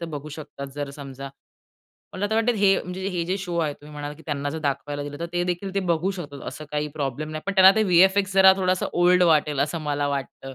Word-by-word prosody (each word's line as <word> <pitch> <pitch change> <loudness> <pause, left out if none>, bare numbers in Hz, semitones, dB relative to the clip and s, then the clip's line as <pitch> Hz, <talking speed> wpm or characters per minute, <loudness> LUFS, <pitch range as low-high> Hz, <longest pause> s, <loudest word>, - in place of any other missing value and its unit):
तर 170 - -4
बघू 145 +2 -8
शकतात 145 -2 -8
जर 145 -1 -4
समजा 140 -1 -8 0.8
मला 185 - -3
आता 210 +2 -1
वाटतं, 225 +2 +2
हे 200 -2 +3
म्हणजे 185 +2 -5
हे 175 -3 -2
जे 185 +2 0
शो 180 -3 -4
आहे, 155 -3 0
तुम्ही 150 +1 -15
म्हणालात, 145 0 -6
की 160 - -16
त्यांना 145 -2 -2
जर 160 - -4
दाखवायला 145 -1 -3
दिलं 145 0 -7
तर 170 - -2
ते 175 0 0
देखील 180 +2 -3
ते 200 - +1
बघू 170 +3 +1
शकतात, 150 -7 -7
असं 155 - -8
काही 150 0 -2
प्रॉब्लेम 150 +1 -3
नाही. 155 0 -5
पण 200 - 0
त्यांना 190 -1 +9
ते 220 - +4
व्हीएफएक्स 190 +1 +4
जरा 190 0 +8
थोडासा 185 -1 0
ओल्ड 180 +1 +4
वाटेल 150 -4 +3
असं 150 +4 0
मला 145 -1 -1
वाटतं. 135 -1 -5
160 Hz, 240 wpm, -24 LUFS, 145-185 Hz, 0.8 s, त्यांना